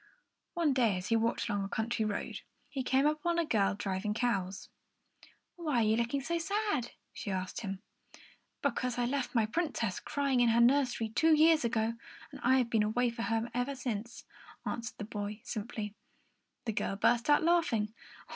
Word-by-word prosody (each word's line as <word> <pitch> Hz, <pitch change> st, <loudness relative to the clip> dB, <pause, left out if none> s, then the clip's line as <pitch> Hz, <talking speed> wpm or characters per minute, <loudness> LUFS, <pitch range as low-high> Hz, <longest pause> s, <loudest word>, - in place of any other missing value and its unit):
One 330 Hz, -5 st, +2 dB
day, 230 Hz, -7 st, +2 dB
as 180 Hz, -, -5 dB
he 230 Hz, -, +3 dB
walked 230 Hz, +1 st, +1 dB
along 205 Hz, -3 st, -1 dB
a 195 Hz, -, -4 dB
country 220 Hz, +1 st, -1 dB
road, 210 Hz, -1 st, -3 dB, 0.3 s
he 270 Hz, -, -2 dB
came 265 Hz, +2 st, +2 dB
upon 305 Hz, +3 st, +1 dB
a 340 Hz, -, +2 dB
girl 205 Hz, -7 st, +2 dB
driving 205 Hz, +1 st, -2 dB
cows. 200 Hz, -6 st, -1 dB, 0.9 s
"Why 300 Hz, -8 st, +1 dB
are -, -, +4 dB
you 215 Hz, 0 st, +3 dB
looking 235 Hz, +4 st, 0 dB
so 335 Hz, +5 st, -1 dB
sad?" 335 Hz, -, -1 dB, 0.2 s
she -, -, -6 dB
asked 185 Hz, -1 st, -3 dB
him. 195 Hz, -1 st, -5 dB, 0.8 s
"Because 250 Hz, -1 st, 0 dB
I 245 Hz, -, +1 dB
left 265 Hz, 0 st, -2 dB
my 225 Hz, -2 st, +4 dB
Princess 230 Hz, -, -1 dB
crying 280 Hz, -3 st, 0 dB
in 240 Hz, -1 st, +5 dB
her 230 Hz, +1 st, +4 dB
nursery 245 Hz, -2 st, +3 dB
two 315 Hz, +8 st, +4 dB
years 315 Hz, 0 st, +5 dB
ago, 230 Hz, -1 st, +1 dB, 0.4 s
and -, -, -10 dB
I 260 Hz, +2 st, +5 dB
have 245 Hz, -2 st, +1 dB
been 225 Hz, -, +3 dB
away 235 Hz, +3 st, +1 dB
from 235 Hz, 0 st, -4 dB
her 225 Hz, 0 st, 0 dB
ever 245 Hz, +3 st, -1 dB
since," 235 Hz, -3 st, -5 dB, 0.4 s
answered 235 Hz, 0 st, -4 dB
the 210 Hz, -, -5 dB
boy, 210 Hz, 0 st, -5 dB
simply. 215 Hz, -3 st, -4 dB, 0.7 s
The 225 Hz, -, -1 dB
girl 195 Hz, -, -1 dB
burst 235 Hz, +5 st, +2 dB
out 295 Hz, -, +5 dB
laughing. 315 Hz, -11 st, +2 dB
235 Hz, 180 wpm, -32 LUFS, 215-275 Hz, 0.9 s, in